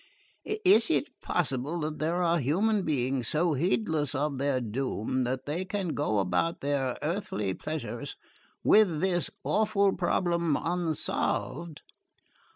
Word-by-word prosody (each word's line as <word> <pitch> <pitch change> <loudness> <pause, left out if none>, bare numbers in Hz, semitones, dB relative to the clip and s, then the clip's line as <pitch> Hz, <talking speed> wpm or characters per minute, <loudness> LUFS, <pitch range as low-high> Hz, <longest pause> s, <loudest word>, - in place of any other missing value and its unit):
"Is 385 +3 +6
it - - +1
possible 150 0 -1
that 150 0 -3
there 170 +4 0
are 170 0 +2
human 195 - +1
beings 130 -6 0
so 165 +1 +2
heedless 155 - 0
of 140 0 -1
their 140 -1 +1
doom 125 +1 -2
that 130 +1 -3
they 160 +6 -2
can 190 -1 -3
go 145 -8 0
about 95 - 0
their 135 -3 -1
earthly 150 - -2
pleasures 155 +9 -5 0.5
with 195 -8 +5
this 180 -2 +1
awful 210 -2 +2
problem 170 -3 +1
unsolved? 170 -1 -2
155 Hz, 125 wpm, -28 LUFS, 135-175 Hz, 0.5 s, Is